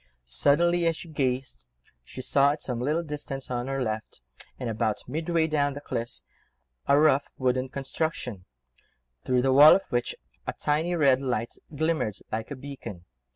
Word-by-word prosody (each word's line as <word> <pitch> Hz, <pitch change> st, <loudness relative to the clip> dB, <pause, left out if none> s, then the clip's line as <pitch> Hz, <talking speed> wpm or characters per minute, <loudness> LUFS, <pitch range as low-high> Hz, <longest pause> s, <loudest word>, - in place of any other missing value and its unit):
Suddenly, 170 Hz, -, +3 dB
as 165 Hz, -, +2 dB
she 170 Hz, -, -8 dB
gazed, 130 Hz, -, -2 dB, 0.4 s
she 130 Hz, -, -9 dB
saw 140 Hz, +2 st, +4 dB
at 150 Hz, -, -9 dB
some 120 Hz, -2 st, -3 dB
little 155 Hz, +6 st, 0 dB
distance 145 Hz, -4 st, -5 dB
on 120 Hz, 0 st, -2 dB
her 135 Hz, -1 st, -1 dB
left, 110 Hz, -, -5 dB, 0.3 s
and 125 Hz, -, -4 dB
about 110 Hz, -1 st, -1 dB
midway 160 Hz, +4 st, 0 dB
down 145 Hz, -3 st, 0 dB
the -, -, -5 dB
cliffs, 120 Hz, -4 st, -4 dB, 0.6 s
a 140 Hz, +1 st, +5 dB
rough 150 Hz, -2 st, +4 dB
wooden 130 Hz, 0 st, 0 dB
construction, 135 Hz, -, -3 dB, 0.8 s
through 125 Hz, -1 st, +1 dB
the 135 Hz, 0 st, +3 dB
walls 145 Hz, +3 st, +9 dB
of -, -, -31 dB
which 120 Hz, 0 st, 0 dB, 0.3 s
a -, -, -1 dB
tiny 160 Hz, +4 st, 0 dB
red 135 Hz, -5 st, +4 dB
light 120 Hz, -4 st, -2 dB, 0.2 s
glimmered 155 Hz, -8 st, 0 dB, 0.2 s
like 110 Hz, 0 st, -3 dB
a 140 Hz, -, -5 dB
beacon. 125 Hz, -10 st, -9 dB
135 Hz, 160 wpm, -27 LUFS, 120-150 Hz, 0.8 s, walls